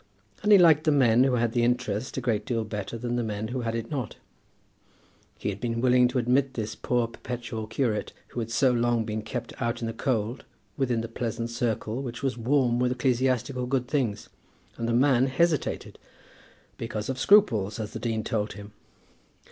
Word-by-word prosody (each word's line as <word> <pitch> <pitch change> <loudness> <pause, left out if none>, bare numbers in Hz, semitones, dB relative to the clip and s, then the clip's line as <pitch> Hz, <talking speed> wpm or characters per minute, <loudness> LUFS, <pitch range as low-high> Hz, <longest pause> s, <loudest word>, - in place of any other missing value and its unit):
And 210 - +2
he 205 - +10
liked 160 -4 +5
the 155 - +4
men 125 -3 +5
who 130 -2 +2
had 120 -1 +1
the 120 0 +1
interest 125 -1 -1
a - - -1
great 110 -4 0
deal 115 -1 -1
better 105 +1 -5
than 120 +1 -2
the 120 - 0
men 110 0 -3
who 125 0 -3
had 115 -1 -2
it 115 +3 -4
not. 130 -7 -3 1.2
He - - -3
had 100 0 -5
been 115 -1 -1
willing 125 0 +5
to 125 - -2
admit 130 +2 +1
this 110 -2 -3
poor 120 -1 0
perpetual 115 -1 -6
curate, 115 -2 -1 0.2
who - - -5
had 115 -1 -3
so 125 +3 +3
long 120 -1 +1
been 110 0 -3
kept 120 +2 -5
out 120 -1 -1
in 115 - -3
the 115 - -3
cold, 115 0 -1 0.3
within 125 -4 0
the 115 - -4
pleasant 115 0 -4
circle 115 0 -2
which 120 -1 -6
was 135 -1 0
warm 120 0 +2
with 125 0 +2
ecclesiastical 125 0 0
good 125 -1 0
things, 125 -8 -1 0.5
and 115 - -3
the - - +1
man 130 +1 +4
hesitated, 155 +3 0 0.8
because 110 -2 -4
of 130 -1 -3
scruples, 115 - +4
as 105 -1 -5
the - - -5
dean 110 -2 -2
told 105 -1 -2
him! 105 0 -10
120 Hz, 195 wpm, -27 LUFS, 115-130 Hz, 1.2 s, he